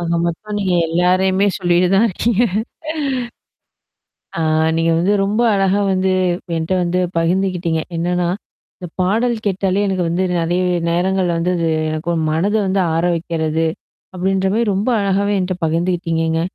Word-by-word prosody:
ஆக 170 - -3 0.2
மொத்தம் 205 +5 -3
நீங்க 190 -3 0
எல்லாரையுமே 185 +3 +2
சொல்லிட்டு 175 0 +2
தான் 215 +4 +4
இருக்கீங்க. 225 +3 0 2.0
ஆ. - - -1 0.4
நீங்க 165 0 +2
வந்து 180 +5 +2
ரொம்ப 210 +4 0
அழகா 195 0 +2
வந்து 190 0 +1 0.4
என்ட்ட 160 +3 -2
வந்து 175 +1 0 0.2
பகிர்ந்துகிட்டீங்க. 175 -1 0 0.2
என்னன்னா, 175 +1 0 0.5
இந்தப் 175 -2 -10
பாடல் 225 +7 +1
கேட்டாலே 195 0 0
எனக்கு 185 -2 0
வந்து 175 +3 0
நிறைய 175 +2 0 0.3
நேரங்கள்ல 180 0 +1
வந்து 175 +2 0
அது 165 -1 0 0.3
என்னுடைய 170 +2 -2
மனத 175 +7 0
வந்து 190 +1 +1
ஆற 165 +1 0
வைக்கிறது 165 -1 -1 0.5
அப்படின்ற 190 +1 0
மாரி 230 +2 +2
ரொம்ப 200 +5 -1
அழகாவே 200 +1 +1
என்ட்ட 185 0 -1
பகிர்ந்துகிட்டீங்கங்க. 165 -1 0
180 Hz, 135 wpm, -18 LUFS, 170-195 Hz, 2.0 s, தான்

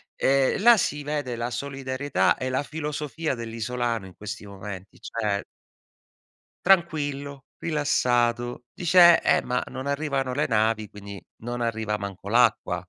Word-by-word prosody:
Ehm, 135 +6 +2
là 235 0 +8
si 145 -5 -1
vede 145 -4 -3
la 120 +1 -3
solidarietà 135 +1 -1
e 130 0 -3
la 130 +3 0
filosofia 150 0 -3
dell'isolano 115 -1 -3
in 90 - -15
questi 105 +1 -7
momenti, 100 -1 -9
cioè 105 -3 -2 1.2
tranquillo, 145 -6 +1 0.2
rilassato; 120 -6 +1
dice: 175 0 +6
"Eh, - - +3
ma 125 0 -1
non 130 - -6
arrivano 140 -3 -1
le 145 - 0
navi, 110 -1 +1
quindi 100 -2 -10 0.2
non 120 0 -4
arriva 110 -2 -1
manco 100 -1 -7
l'acqua." 110 -6 +2
125 Hz, 130 wpm, -25 LUFS, 110-145 Hz, 1.2 s, là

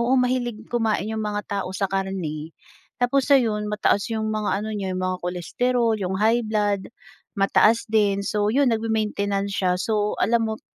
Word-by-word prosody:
oo 245 +3 +2
mahilig 245 -3 0
kumain 220 -4 0
yung 220 - -2
mga 210 0 -2 0.2
tao - - -4
sa 200 - 0
karne 180 -5 -3 0.5
tapos 255 +3 +2
ayon 215 -6 +3
mataas 210 -1 +1
yung 220 -1 -1
mga 210 -1 -1
ano 215 - -4
niya 195 -3 -3
yung 185 - -3
mga 185 0 -1
cholesterol, 225 +7 0
yung 190 -2 -2
high 225 +3 +3
blood, 205 -2 0 0.5
mataas 215 +3 +3
din, 205 -2 +2
so 205 0 0
yun 275 +1 +3
nagme-maintenance 210 -3 -1
siya. 185 -2 +2
So, 210 0 0
alam 230 0 +2
mo 220 0 -4
210 Hz, 170 wpm, -23 LUFS, 200-230 Hz, 0.5 s, ayon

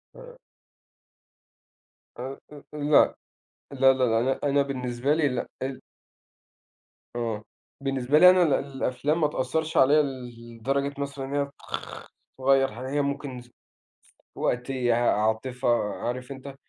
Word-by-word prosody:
آآ - - -13 1.8
أ - - -7 0.3
أ - - -10 0.2
أ - - -5
لأ، 145 0 +4 0.6
لا، 135 -1 +5
لا، 130 -1 0
لا، 115 -2 +3
أنا 130 +3 0
أنا 140 0 +3
بالنسبة 130 0 -1
لي 155 -1 +2
لأ، 125 -2 -3 0.2
ال 130 0 -5 1.3
أه، 115 -3 -3 0.4
بالنسبة 135 +1 +1
لي 180 +2 +10
أنا 185 0 +5
ال 155 -5 +2
الأفلام 140 +3 -1
ما 150 - +4
تأثّرش 150 +3 -2
عليَّ 145 +3 +6
ل 120 -4 -7
لدرجة 140 +4 -1
مثلًا 140 -1 -4
إن 135 - -6
هي 140 - +1
تخ 140 - -18 0.7
تغيّر 135 -1 +3
حاجة. 125 +4 -6
هي 145 +1 +1
ممكن 140 -2 -4
ف 120 0 -17 0.8
وقتيّة، 125 -1 0
عاطفة، 120 +2 0 0.3
عارف 125 +2 -4
أنت 135 0 -9
135 Hz, 135 wpm, -26 LUFS, 125-140 Hz, 1.8 s, لي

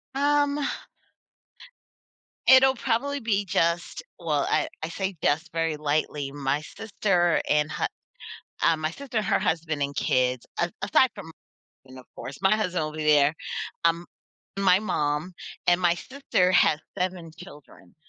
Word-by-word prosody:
Um 290 +1 +2 1.9
it'll 265 0 +7
probably 265 +4 -1
be 205 -4 0
just 170 -1 0 0.2
well, 150 -4 0
I - - +1 0.2
I 160 - -3
say 190 +2 -3
"just" 160 +3 +1
very 165 -1 -1
lightly, 145 -1 -1
my 140 0 -1
sister 195 -1 0
and 150 0 +2
hu - - -3 0.8
uh, 165 -1 +4
my 155 0 -2
sister 260 +3 -6
and 215 - 0
her - - +2
husband 160 -3 -1
and 140 0 -4
kids, 125 -1 +1
a 175 0 0
aside 260 - +4
from 180 -6 -9 0.5
and 130 0 -13
of 125 - -15
course, 135 +4 -8
my 190 +2 +4
husband 180 -6 -1
will 155 - -5
be 155 0 -4
there, 150 -1 +5 0.5
um, 170 +1 +2 0.5
my 190 -1 +5
mom, 155 -4 -1 0.3
and 175 0 +4
my 175 -1 +3
sister 260 -7 0
has 155 -4 +4 0.2
7 180 -3 -3
children, 145 - -14
170 Hz, 145 wpm, -26 LUFS, 150-200 Hz, 1.9 s, it'll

